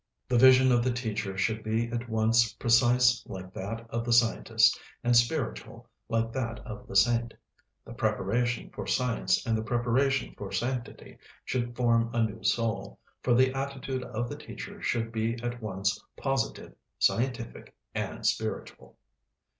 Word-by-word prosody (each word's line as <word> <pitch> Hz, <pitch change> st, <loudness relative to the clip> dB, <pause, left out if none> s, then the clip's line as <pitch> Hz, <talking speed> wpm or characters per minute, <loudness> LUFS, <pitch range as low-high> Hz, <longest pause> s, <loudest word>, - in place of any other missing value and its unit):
The 125 Hz, -, +2 dB
vision 130 Hz, 0 st, +7 dB
of 120 Hz, -1 st, +3 dB
the 130 Hz, -, +1 dB
teacher 110 Hz, -5 st, -3 dB
should 110 Hz, +3 st, 0 dB
be 110 Hz, +2 st, -1 dB
at 120 Hz, 0 st, -4 dB
once 110 Hz, 0 st, +3 dB
precise 120 Hz, +1 st, +4 dB
like 95 Hz, -2 st, -8 dB
that 115 Hz, +4 st, -5 dB
of 115 Hz, 0 st, -1 dB
the 120 Hz, -, -2 dB
scientist, 115 Hz, -1 st, +4 dB, 0.2 s
and 120 Hz, 0 st, +3 dB
spiritual 120 Hz, +3 st, 0 dB, 0.2 s
like 115 Hz, 0 st, 0 dB
that 120 Hz, -3 st, -3 dB
of 125 Hz, +1 st, -8 dB
the -, -, -8 dB
saint. 115 Hz, +3 st, +3 dB, 0.5 s
The -, -, -9 dB
preparation 120 Hz, +5 st, -1 dB
for -, -, -7 dB
science 115 Hz, -7 st, +1 dB
and 115 Hz, -2 st, +1 dB
the 110 Hz, -, -1 dB
preparation 120 Hz, +4 st, 0 dB
for 100 Hz, -1 st, -7 dB
sanctity 120 Hz, +4 st, -4 dB, 0.3 s
should 120 Hz, -1 st, -2 dB
form 115 Hz, -2 st, +2 dB
a 115 Hz, -, +3 dB
new 110 Hz, 0 st, -4 dB
soul, 115 Hz, -, -1 dB, 0.2 s
for 120 Hz, -, +2 dB
the 130 Hz, +1 st, +4 dB
attitude 135 Hz, -1 st, -3 dB
of 120 Hz, -1 st, -3 dB
the -, -, -6 dB
teacher -, -, -9 dB
should 115 Hz, -1 st, -1 dB
be 115 Hz, 0 st, -1 dB
at 120 Hz, 0 st, -4 dB
once 95 Hz, -2 st, -2 dB
positive, 135 Hz, -1 st, -2 dB, 0.2 s
scientific, 120 Hz, -, -1 dB, 0.2 s
and -, -, -4 dB
spiritual. -, -, -3 dB
115 Hz, 155 wpm, -28 LUFS, 110-125 Hz, 0.5 s, vision